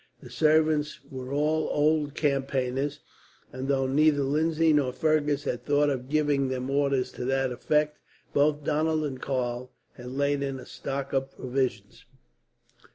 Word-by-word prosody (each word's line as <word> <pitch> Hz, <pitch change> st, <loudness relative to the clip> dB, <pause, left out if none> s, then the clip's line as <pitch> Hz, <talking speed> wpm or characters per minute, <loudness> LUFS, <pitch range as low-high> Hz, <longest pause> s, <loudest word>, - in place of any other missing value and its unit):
The -, -, -13 dB
servants 155 Hz, -1 st, +2 dB
were 130 Hz, -1 st, -6 dB
all 155 Hz, +2 st, +1 dB
old 150 Hz, -1 st, +1 dB
campaigners, 135 Hz, 0 st, -1 dB, 0.5 s
and 130 Hz, +1 st, -4 dB
though 135 Hz, -1 st, +1 dB
neither 145 Hz, +2 st, +3 dB
Lindsay 160 Hz, +3 st, +2 dB
nor 140 Hz, -4 st, +2 dB
Fergus 150 Hz, +1 st, +1 dB
had 120 Hz, -3 st, -3 dB
thought 145 Hz, +1 st, +2 dB
of 130 Hz, -1 st, -4 dB
giving 145 Hz, -2 st, +2 dB
them 130 Hz, 0 st, -3 dB
orders 140 Hz, -2 st, +1 dB
to 125 Hz, -, -6 dB
that 135 Hz, 0 st, +1 dB
effect, 150 Hz, +4 st, 0 dB, 0.3 s
both 145 Hz, +1 st, +2 dB
Donald 155 Hz, +2 st, +1 dB
and 130 Hz, -3 st, -5 dB
Karl 125 Hz, -2 st, -2 dB, 0.3 s
had 125 Hz, 0 st, -8 dB
laid 140 Hz, +2 st, 0 dB
in 135 Hz, -1 st, -2 dB
a -, -, -10 dB
stock 135 Hz, 0 st, -5 dB
of 135 Hz, 0 st, 0 dB
provisions. 125 Hz, -4 st, -3 dB
140 Hz, 150 wpm, -27 LUFS, 130-150 Hz, 0.5 s, neither